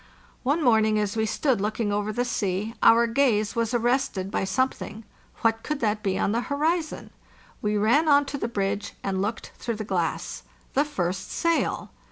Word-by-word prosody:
One 290 +5 +1
morning, 220 -3 +4
as 210 0 -1
we 220 0 +1
stood 255 -1 +1
looking 210 0 -1
over 205 +1 -1
the 245 +3 -1
sea, 210 -2 -1
our 235 +1 +6
gaze 230 -3 +2
was 230 -1 0
arrested 240 -5 0
by - - 0
some 260 +7 +2
thing; 220 -3 -9 0.4
what 225 0 +2
could 300 +4 -3
that 210 -1 +1
be 195 -3 0
on 195 - +1
the 230 +2 +1
horizon? 310 +5 -1 0.5
We 210 0 0
ran 245 +10 +3
on 285 0 +5
to 280 - -5
the - - -1
bridge 200 -2 -2
and 190 -1 -1
looked 215 +3 -3
through 235 -2 -2
the 215 - -4
glass. 175 -4 -2 0.3
The 285 +3 +3
first 185 - -3
sail. 335 0 0
225 Hz, 185 wpm, -26 LUFS, 205-260 Hz, 0.5 s, our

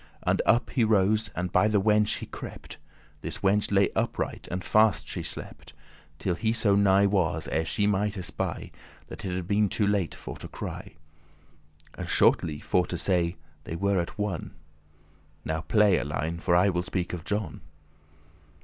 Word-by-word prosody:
And - - +2
up 120 +2 +3
he 125 - +2
rose, 110 0 +3
and 90 0 -2
by 95 +3 +4
the 105 -1 +2
wench 105 +1 +2
he - - -6
crept. - - -9 0.4
This - - -6
wenche 100 +2 +2
lay 100 0 +3
upright, - - -2
and 90 +1 -3
fast 110 +3 +3
she - - -4
slept, - - -8 0.4
Till 90 +3 -1
he 110 +5 0
so 105 -3 +3
nigh 100 0 +4
was, 95 -5 +1
ere 80 +1 0
she 105 +5 0
might 105 0 0
espy, 90 -3 -4 0.4
That - - -9
it 90 -2 -3
had 90 -2 -4
been 105 0 +2
too 105 - 0
late 100 -4 0
for - - -8
to - - -8
cry: - - -7 1.0
And, - - -7
shortly 75 -3 +3
for 90 +3 +1
to 90 - -3
say, 85 0 +1 0.3
they 80 - -5
were 100 +2 +1
at 85 - -4
one. 105 -5 -3 0.9
Now 80 0 -2
play, 105 +1 +3
Alein, 80 +4 -3
for 85 - +2
I 90 +3 +5
will 90 -2 0
speak 90 0 -3
of 85 -3 -5
John. 105 -7 -3
95 Hz, 175 wpm, -27 LUFS, 90-105 Hz, 1.0 s, I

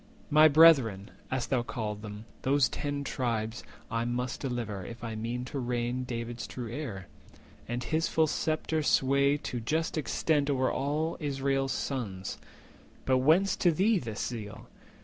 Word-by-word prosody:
My 155 +1 +8
brethren, 140 -11 +5 0.2
as 130 -1 -1
thou 130 -3 +1
call'st 110 -4 -4
them, 105 0 -8 0.2
those 135 -1 +3
Ten 145 -1 -3
Tribes, 115 -4 -2 0.3
I 115 0 0
must 125 +1 -2
deliver, 120 -7 -3
if 115 +4 -9
I 115 -1 -4
mean 115 +3 -3
to 135 +2 -4
reign 120 0 -1
David's 115 -1 -5
true 120 -3 -6
heir, 115 - -5 0.6
and 120 +1 -3
his 160 +5 0
full 160 - +3
sceptre 155 +1 -1
sway 140 0 +3
To 125 -4 -4
just 160 +7 -1
extent 145 +1 +1
over 130 -2 +2
all 150 +4 -1
Israel's 135 -2 0
sons! 100 -9 -3 0.7
But 130 -1 +3
whence 180 +8 +4
to 175 - +4
thee 195 +6 +3
this 110 -5 -4
zeal? 110 -3 -6
130 Hz, 150 wpm, -29 LUFS, 115-145 Hz, 0.7 s, My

